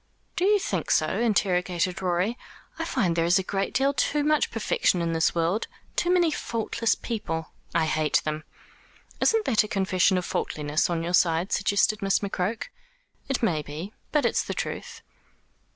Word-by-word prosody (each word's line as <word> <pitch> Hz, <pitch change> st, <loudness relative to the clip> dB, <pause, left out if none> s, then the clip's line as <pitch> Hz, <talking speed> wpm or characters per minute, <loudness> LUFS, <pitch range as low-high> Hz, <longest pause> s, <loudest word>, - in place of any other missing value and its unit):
"Do 365 Hz, 0 st, +1 dB
you 415 Hz, +1 st, +5 dB
think 390 Hz, -, -3 dB
so?" -, -, +3 dB
interrogated 185 Hz, -5 st, +1 dB
Rorie. 185 Hz, +5 st, 0 dB, 0.4 s
"I 330 Hz, -, -1 dB
find 205 Hz, -, 0 dB
there 165 Hz, -, +2 dB
is 175 Hz, +3 st, +4 dB
a 190 Hz, -, 0 dB
great 195 Hz, +1 st, -2 dB
deal 275 Hz, +1 st, +2 dB
too 290 Hz, +3 st, +1 dB
much 305 Hz, 0 st, +2 dB
perfection 470 Hz, -, +1 dB
in 170 Hz, -1 st, -1 dB
this 165 Hz, +1 st, +1 dB
world, 170 Hz, +6 st, 0 dB, 0.3 s
too 350 Hz, -, +1 dB
many 350 Hz, -3 st, +3 dB
faultless 230 Hz, -4 st, -1 dB
people 165 Hz, -9 st, -4 dB, 0.2 s
I 165 Hz, -1 st, +3 dB
hate 155 Hz, -1 st, +1 dB
them." 155 Hz, 0 st, -3 dB, 0.8 s
"Isn't 445 Hz, -1 st, +3 dB
that 225 Hz, -5 st, +3 dB
a -, -, -5 dB
confession 190 Hz, -2 st, +2 dB
of 180 Hz, -, -2 dB
faultiness 150 Hz, +2 st, -1 dB
on 165 Hz, -1 st, -1 dB
your 175 Hz, +1 st, -3 dB
side?" 170 Hz, +1 st, +3 dB
suggested 205 Hz, +1 st, +2 dB
Miss 195 Hz, -1 st, +2 dB
McCroke. 200 Hz, -, -2 dB, 0.6 s
"It 270 Hz, -3 st, -1 dB
may 165 Hz, -9 st, +2 dB
be. 155 Hz, +8 st, -7 dB, 0.2 s
But 300 Hz, -, +2 dB
it's -, -, +2 dB
the -, -, -5 dB
truth." -, -, -5 dB
190 Hz, 170 wpm, -26 LUFS, 170-235 Hz, 0.8 s, you